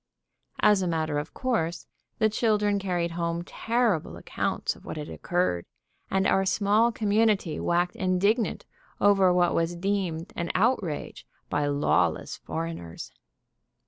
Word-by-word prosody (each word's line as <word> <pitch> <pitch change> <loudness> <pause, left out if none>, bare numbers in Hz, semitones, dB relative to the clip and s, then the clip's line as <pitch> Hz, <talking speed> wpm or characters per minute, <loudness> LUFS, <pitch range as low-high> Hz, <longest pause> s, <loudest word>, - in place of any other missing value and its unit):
As 210 -2 +5
a 185 - 0
matter 160 -3 0
of 145 - -6
course 215 -10 -1 0.3
the 220 - +3
children 210 -2 +1
carried 175 -3 -1
home 170 0 -2
terrible 225 -4 0
accounts - - -2
of - - -17
what - - -6
had 150 0 -6
occurred, 175 - -1 0.5
and 190 0 +1
our 195 - +3
small 210 +4 +3
community 210 -5 +1
waxed 175 +1 0
indignant 200 +5 +1 0.3
over 195 -2 +5
what 180 -1 +3
was 165 +1 0
deemed 180 -3 -2
an 170 -1 -3
outrage 190 - -1 0.2
by 145 0 +1
lawless 145 0 +1
foreigners. 165 - -6
185 Hz, 130 wpm, -27 LUFS, 165-205 Hz, 0.5 s, As